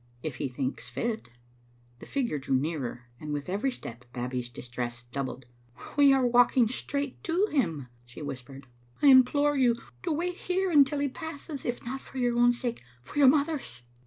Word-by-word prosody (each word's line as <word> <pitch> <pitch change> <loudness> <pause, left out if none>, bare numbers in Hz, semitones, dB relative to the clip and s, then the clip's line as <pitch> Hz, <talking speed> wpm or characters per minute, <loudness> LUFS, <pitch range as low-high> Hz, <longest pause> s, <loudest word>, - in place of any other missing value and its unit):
"If 150 -6 -4
He 140 - -1
thinks 130 -1 -4
fit." 220 - -3 0.7
The - - -11
figure 240 - -1
drew 135 0 0
nearer, 130 -4 -2
and 150 -1 -6
with 145 -1 -3
every 205 +8 0
step 120 - -8
Babbie's 125 0 -3
distress 120 0 -6
doubled. 130 +1 -5 0.5
"We 285 -1 +7
are 265 -2 +4
walking 245 0 +5
straight 280 +3 -3
to 350 +4 +2
him," 165 - 0 0.2
she 120 +5 -10
whispered. 135 0 -7 0.2
*' 120 - -31
I 285 - +8
implore 285 +3 +6
you 245 -3 +3 0.2
to 345 - -2
wait 350 +4 -1
here 370 +1 0
until 290 -2 +5
he 285 0 +1
passes, 290 0 -7
if 240 -1 -3
not 265 +3 -4
for 270 - -11
your 245 -2 +1
own 240 0 +6
sake, 240 -1 -3 0.2
for 215 - -5
your 280 - +8
mother's." 280 - +1
240 Hz, 180 wpm, -28 LUFS, -, 0.7 s, I